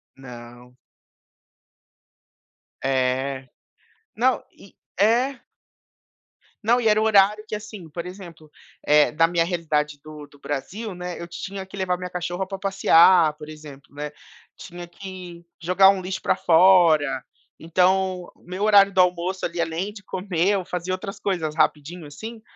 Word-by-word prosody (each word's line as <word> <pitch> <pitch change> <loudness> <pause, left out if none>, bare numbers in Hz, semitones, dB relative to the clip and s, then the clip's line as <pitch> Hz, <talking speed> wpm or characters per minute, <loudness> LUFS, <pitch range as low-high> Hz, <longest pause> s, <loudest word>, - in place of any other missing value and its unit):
Não. 125 -1 -13 2.1
É. 130 0 -1 0.7
Não, 255 +3 +2
e 195 - -18 0.2
é 240 +6 +2 1.3
Não, 235 +3 +3
e 235 - 0
era 215 0 +4
o - - +2
horário 210 0 +4
que, 215 - -4
assim, 205 -5 -9
por 170 +3 -6
exemplo, 170 -5 -11 0.3
eh, 150 0 +4
da 165 +2 +3
minha 170 -1 +1
realidade 150 -4 -2
do 150 -1 -11
do 145 - -20
Brasil, 190 +11 -5
né, 180 -1 -6
eu 170 - -7
tinha 190 +3 -7
que 190 - -12
levar 185 -2 -1
minha 180 0 -6
cachorra 180 +1 -3
pra 195 -1 -6
passear, 180 -4 +5
por 150 0 -10
exemplo, 150 -3 -12
né, 150 0 -5 0.4
tinha 175 -1 -10
que 180 -1 -10 0.2
jogar 185 +3 +5
um 195 -1 +1
lixo 185 +1 -5
pra - - +1
fora. 165 -7 +4 0.4
Então, 185 +2 +1
o - - -27
meu 185 +3 -5
horário 200 -2 +6
do 190 - 0
almoço 180 +1 0
ali, 170 0 -5
além 170 +5 -2
de 200 -2 -13
comer, 185 -1 -1
eu 195 -3 0
fazia 180 0 -4
outras 195 +2 -6
coisas 160 -6 -2
rapidinho 160 +2 -1
assim, 220 +10 -9
180 Hz, 150 wpm, -23 LUFS, 155-195 Hz, 2.1 s, horário